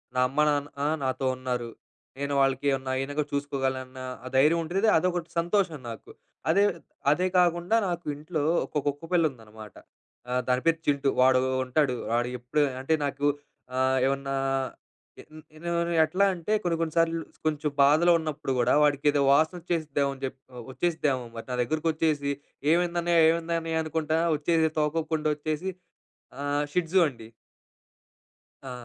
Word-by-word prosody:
నా 125 - +2
అమ్మా, 150 +3 +2
నాన్న 145 0 -2 0.2
నాతో 130 +1 -1
ఉన్నారు. 125 -2 -3 0.5
నేను 140 0 -2
వాళ్ళకి 135 +1 +1
ఏమన్నా 130 -1 -2
అయిన 135 +2 -3 0.2
చూసుకోగలన్నా, 130 -2 -3 0.2
ఆ - - -5
ధైర్యం 155 +5 +4
ఉంటది. 195 +7 0
అదొకటి 175 -1 -1
సంతోషం 175 -3 0
నాకు. 115 - -9 0.4
అదే 200 +5 +4 0.5
అదే 180 +4 +2
కాకుండా 175 +4 +2
నాకు 175 0 -4
ఇంట్లో 155 0 -3 0.2
ఒక 150 - -5
కుక్క 145 +3 -2
పిల్ల 170 -3 +3
ఉందనమాట. 110 -4 -13 0.7
దాని 125 0 +2
పేరు 165 -1 +3
చింటు. 140 -1 +2
వాడు 130 0 +5 0.3
ఉంటాడు. 130 0 +1 0.2
వాడు 120 +1 +1
ఎప్పుడు 125 +5 -1 0.2
అంటే 160 +4 0
నాకు 140 +1 -2 0.5
ఆహ్, 130 0 +2
ఏమన్నా 135 0 -2 1.2
ఎన్ 165 +2 -13
ఎ - - -1 0.3
ఎట్లా 185 +6 +2
అంటే, 180 +5 -3
కొన్ని 170 -2 +1
కొన్ని 160 -2 -2
సార్లు, 165 0 +2 0.2
కొంచెం 150 -1 0
బాధలో 155 +5 +5
ఉన్నప్పుడు 150 -3 -3
కూడా 120 +1 +3
వాడికి 145 -1 +1
ఏదో 145 - +1
వాసన 160 +5 +3
వచ్చేసిద్దామని 145 -5 -2
చెప్పి 130 - -6 0.3
వచ్చేసిద్దేమో 150 -5 0
మరి 115 - -7
నా 125 - -2
దగ్గరకి 155 +6 -1
వచ్చేసి 150 -3 0 0.4
"ఏమైంది 175 0 +2
అన్నయ్య? 170 -1 +3
ఏమైంది 170 0 0
అన్నయ్య?" 160 0 -1
అనుకుంటా 160 0 -1 0.2
వచ్చేసి 160 +1 +2
తోకకూపుకుంటా 155 0 0
వచ్చేసి, 155 +5 -3 0.7
ఆహ్, 145 +1 0
'షిడ్జు' 180 +1 +2
అండి. 115 -4 -11 1.4
ఆ! - - -5
150 Hz, 145 wpm, -27 LUFS, 135-165 Hz, 1.4 s, వాడు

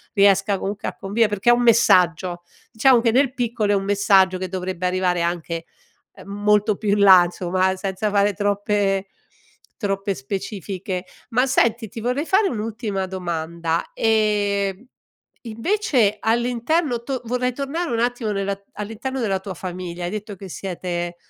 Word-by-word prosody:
riesca 195 -1 +4
comunque 200 +1 -4
a - - -4
convivere 210 +3 +1
perché 205 +2 0
è - - +8
un 240 - +2
messaggio! 180 -6 +3 0.3
Diciamo 245 +1 +4
che 230 -1 +2
nel 260 +1 +2
piccolo 235 -4 -1
è - - +3
un 195 - 0
messaggio 195 -2 +3
che 185 0 -4
dovrebbe 185 -1 -4
arrivare 180 -1 +1
anche, 170 -1 -3 0.5
uhm, - - -13
molto 210 +1 +2
più 215 - -3
in 205 +1 +2
là 190 -3 +8
insomma 185 +2 0
senza 195 +2 -2
fare 205 0 +2
troppe 200 0 0 0.7
troppe 195 -2 -1
specifiche. 190 +4 -5 0.2
Ma 250 +2 +2
senti 235 -3 +2
ti 225 - -8
vorrei 250 +6 -1
fare 390 +1 +3
un'ultima 215 - -3
domanda, 170 -2 -3
ehm, 205 -1 +1 0.6
invece 235 - 0
all'interno 240 +4 0
to 260 0 -3
vorrei 250 +2 0
tornare 285 +6 -3
un 230 - 0
attimo 240 -2 -1
nella 195 0 -1 0.2
all'interno 225 +6 -5
della 200 -5 0
tua 190 0 -7
famiglia: 180 -1 -6
hai 175 - -3
detto 210 -1 -6
che 195 +1 -10
siete, 175 +1 -4
205 Hz, 150 wpm, -22 LUFS, 185-230 Hz, 0.7 s, è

